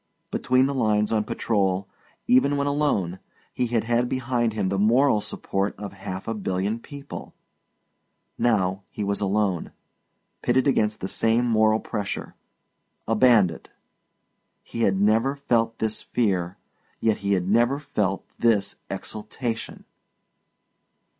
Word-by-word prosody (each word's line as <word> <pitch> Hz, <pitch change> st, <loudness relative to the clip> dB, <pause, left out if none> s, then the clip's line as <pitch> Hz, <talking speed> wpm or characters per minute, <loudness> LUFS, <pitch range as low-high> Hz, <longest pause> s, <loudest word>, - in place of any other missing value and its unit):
Between 130 Hz, +1 st, +2 dB
the 140 Hz, -, -1 dB
lines 105 Hz, -5 st, +1 dB
on 110 Hz, -2 st, +1 dB
patrol, 95 Hz, -3 st, 0 dB, 0.4 s
even 140 Hz, +3 st, +4 dB
when 140 Hz, -, 0 dB
alone, 140 Hz, -, 0 dB, 0.3 s
he 125 Hz, -, 0 dB
had 115 Hz, -1 st, 0 dB
had 120 Hz, +1 st, +1 dB
behind 120 Hz, -2 st, 0 dB
him 100 Hz, -3 st, -1 dB
the 95 Hz, 0 st, -1 dB
moral 115 Hz, +2 st, +4 dB
support 100 Hz, 0 st, -2 dB
of 100 Hz, -1 st, -7 dB
half 95 Hz, -1 st, -7 dB
a 115 Hz, -, -1 dB
billion 100 Hz, +1 st, -2 dB
people; 140 Hz, +3 st, -9 dB, 1.0 s
now 95 Hz, -5 st, +1 dB
he 105 Hz, -, -5 dB
was 100 Hz, 0 st, -1 dB
alone, 100 Hz, -3 st, 0 dB, 0.7 s
pitted 130 Hz, +2 st, +2 dB
against 110 Hz, -6 st, +1 dB
that 95 Hz, -, -2 dB
same 115 Hz, +2 st, +2 dB
moral 110 Hz, -2 st, +3 dB
pressure 105 Hz, -4 st, -4 dB, 0.7 s
a 115 Hz, -, +2 dB
bandit. 105 Hz, -8 st, +3 dB, 0.9 s
He 115 Hz, -, -6 dB
had 95 Hz, -3 st, +2 dB
never 110 Hz, +7 st, +3 dB
felt 115 Hz, -5 st, 0 dB
this 110 Hz, 0 st, -2 dB
fear, 95 Hz, -5 st, -1 dB, 0.4 s
yet 110 Hz, -2 st, +2 dB
he 100 Hz, 0 st, 0 dB
had 90 Hz, -2 st, 0 dB
never 120 Hz, +6 st, +3 dB
felt 105 Hz, -9 st, -2 dB
this 110 Hz, -4 st, +2 dB
exultation. 115 Hz, +2 st, -5 dB
110 Hz, 130 wpm, -25 LUFS, 100-120 Hz, 1.0 s, even